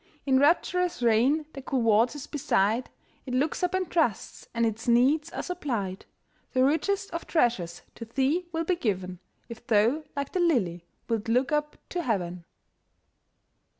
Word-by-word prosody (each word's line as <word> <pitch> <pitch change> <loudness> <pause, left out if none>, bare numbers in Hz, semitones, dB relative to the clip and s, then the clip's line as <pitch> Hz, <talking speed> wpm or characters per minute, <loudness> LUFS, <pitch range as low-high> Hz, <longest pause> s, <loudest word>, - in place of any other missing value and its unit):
In 265 -2 +4
rapturous 355 +1 +2
reign, 245 +7 +3
the 275 - -7
cool 260 -2 -1
waters 230 +5 +2
beside, 235 -4 0 0.4
It 250 - -2
looks 290 +8 0
up 360 0 0
and 375 -1 0
trusts, 310 - -1
and 230 0 +1
its 225 +1 -3
needs 275 +7 +3
are - - -4
supplied. 235 - -4 0.5
The 255 -1 +3
richest 390 +8 +1
of 335 0 -5
treasures 215 - 0
to 230 - -8
thee 275 +9 0
will 325 0 -1
be 360 +1 +1
given, 185 - -2 0.3
If 235 0 -11
thou, 230 +8 +3
like 280 -1 -3
the 370 - -1
lily, 195 - +1 0.2
wilt 225 -2 -2
look 250 +5 +2
up 300 0 -1
to 355 - -2
heaven. 180 - -2
255 Hz, 155 wpm, -27 LUFS, 225-315 Hz, 0.5 s, In